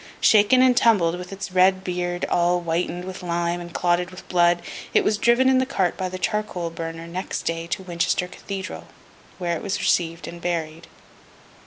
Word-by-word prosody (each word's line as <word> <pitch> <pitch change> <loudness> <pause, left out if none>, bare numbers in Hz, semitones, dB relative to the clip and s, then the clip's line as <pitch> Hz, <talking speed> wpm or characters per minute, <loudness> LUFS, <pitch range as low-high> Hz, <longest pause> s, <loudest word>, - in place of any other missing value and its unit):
Shaken 220 +5 +5
and 255 -1 +5
tumbled, 190 -9 +4
with 180 +1 -8
its 195 -1 -6
red 185 +1 +4
beard 175 -1 -2
all 175 +1 +2
whitened 175 +1 -2
with 190 0 -7
lime 175 0 -1
and 175 0 -9
clotted 175 +1 +1
with 185 0 -12
blood, 175 -1 +3 0.3
it - - +5
was 210 -1 +1
driven 240 +4 +4
in 260 0 +5
the 260 - +2
cart 190 -10 0
by 185 -1 -3
the 185 - -5
charcoal 210 -4 -2
burner 165 0 -6
next 180 +3 -4
day 165 0 -3
to 190 +2 -3
Winchester 175 0 0
Cathedral, 190 +1 -7 0.5
where 175 -2 -1
it - - -5
was 200 - -2
received 165 -1 0
and 170 0 -9
buried. 165 -1 -3
180 Hz, 185 wpm, -23 LUFS, 170-190 Hz, 0.5 s, Shaken